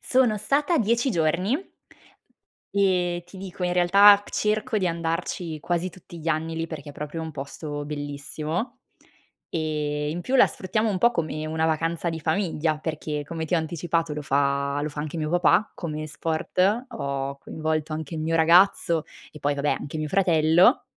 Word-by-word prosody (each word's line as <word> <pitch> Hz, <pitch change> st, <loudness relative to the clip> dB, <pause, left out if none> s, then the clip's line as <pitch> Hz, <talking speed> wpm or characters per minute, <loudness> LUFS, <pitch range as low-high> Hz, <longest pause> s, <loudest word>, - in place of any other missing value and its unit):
Sono 245 Hz, -5 st, +2 dB
stata 290 Hz, -, +1 dB
10 235 Hz, +4 st, +2 dB
giorni 180 Hz, -, 0 dB, 1.0 s
ehm, 180 Hz, -3 st, +2 dB
ti 175 Hz, +2 st, -14 dB
dico 190 Hz, -1 st, -8 dB
in 180 Hz, -, 0 dB
realtà 200 Hz, +3 st, +7 dB
c -, -, -13 dB
cerco 215 Hz, +3 st, 0 dB
di 185 Hz, -, 0 dB
andarci 165 Hz, -1 st, -3 dB
quasi 175 Hz, +2 st, -1 dB
tutti 175 Hz, -1 st, -13 dB
gli 165 Hz, -, -3 dB
anni 160 Hz, +1 st, -1 dB
lì 165 Hz, -, -2 dB
perché 155 Hz, -3 st, -8 dB
è -, -, -12 dB
proprio 150 Hz, +3 st, -5 dB
un 160 Hz, -, -5 dB
posto 145 Hz, +1 st, -6 dB
bellissimo. 150 Hz, -, -4 dB, 0.7 s
Ehm, 150 Hz, -2 st, -2 dB
in 170 Hz, +3 st, -3 dB
più 255 Hz, +8 st, -3 dB
la -, -, +7 dB
sfruttiamo 215 Hz, +4 st, -1 dB
un 190 Hz, -, -1 dB
po' 235 Hz, +5 st, +5 dB
come 155 Hz, -5 st, -2 dB
una 160 Hz, +1 st, -1 dB
vacanza 165 Hz, +2 st, 0 dB
di 160 Hz, -1 st, -5 dB
famiglia 160 Hz, -2 st, 0 dB
perché, 155 Hz, -1 st, -3 dB
come 160 Hz, +2 st, -4 dB
ti 160 Hz, -, -1 dB
ho -, -, +4 dB
anticipato, 165 Hz, 0 st, -1 dB
lo 150 Hz, -, -4 dB
fa 140 Hz, 0 st, +1 dB
lo 150 Hz, -, -1 dB
fa 150 Hz, 0 st, -6 dB
anche 155 Hz, +2 st, -5 dB
mio 155 Hz, -1 st, -2 dB
papà 175 Hz, +4 st, +3 dB
come 155 Hz, -3 st, -5 dB
sport, 180 Hz, -, 0 dB
ho 140 Hz, -, -4 dB
coinvolto 155 Hz, +1 st, -3 dB
anche 155 Hz, 0 st, -5 dB
il 155 Hz, -, -3 dB
mio 165 Hz, +1 st, 0 dB
ragazzo 170 Hz, 0 st, +4 dB, 0.3 s
e 150 Hz, -, -10 dB
poi 145 Hz, 0 st, 0 dB
vabbè 145 Hz, +1 st, 0 dB
anche 155 Hz, +2 st, -6 dB
mio 155 Hz, -, -2 dB
fratello 175 Hz, -, +4 dB
165 Hz, 175 wpm, -25 LUFS, 150-185 Hz, 1.0 s, realtà